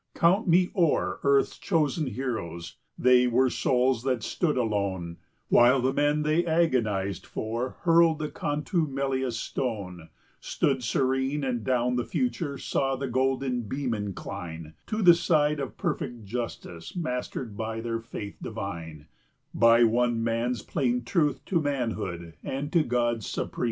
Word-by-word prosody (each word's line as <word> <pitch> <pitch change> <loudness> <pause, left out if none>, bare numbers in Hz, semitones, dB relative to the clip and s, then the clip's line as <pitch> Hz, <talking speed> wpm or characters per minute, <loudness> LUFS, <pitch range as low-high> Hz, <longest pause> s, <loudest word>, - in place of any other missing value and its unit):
55 - - -14
Count 185 +6 +4
me 180 +1 +4
o'er 170 -6 +1
earth's 140 -1 +2
chosen 160 -4 0
heroes, 105 -10 -4 0.2
they 125 0 +5
were 125 +1 +3
souls 125 -1 +1
that 125 -3 -1
stood 155 -6 0
alone, 100 -7 -1 0.3
While 125 +3 +6
the 130 +1 +1
men 145 +1 +2
they 155 +3 +2
agonized 120 - +1
for 115 +4 -4
hurled 165 -2 +4
the 150 -1 -3
contumelious 140 -4 -1
stone, 95 -12 -4 0.3
Stood 135 -2 0
serene, 135 +4 0
and 125 -4 -1
down 125 0 +1
the 120 - 0
future 145 - -2
saw 135 0 -1
the 135 +1 -3
golden 130 0 0
beam 130 +1 -2
incline 85 -6 -6
To 215 0 -1
the 175 -2 +9
side 150 -3 +2
of 135 -2 -5
perfect 120 -3 -3
justice, 100 - -6
mastered 125 - -4
by 110 +1 -3
their 115 0 -2
faith 105 -3 -8
divine, 85 -8 -6 0.5
By 115 +1 +6
one 120 0 +2
man's 115 0 -1
plain 125 -5 0
truth 150 +2 0
to 170 -4 +1
manhood 110 - -3
and 140 +3 -4
to 170 - +5
God's 120 -4 0
supreme - - -3
design. - - -10
125 Hz, 145 wpm, -27 LUFS, 115-145 Hz, 0.5 s, the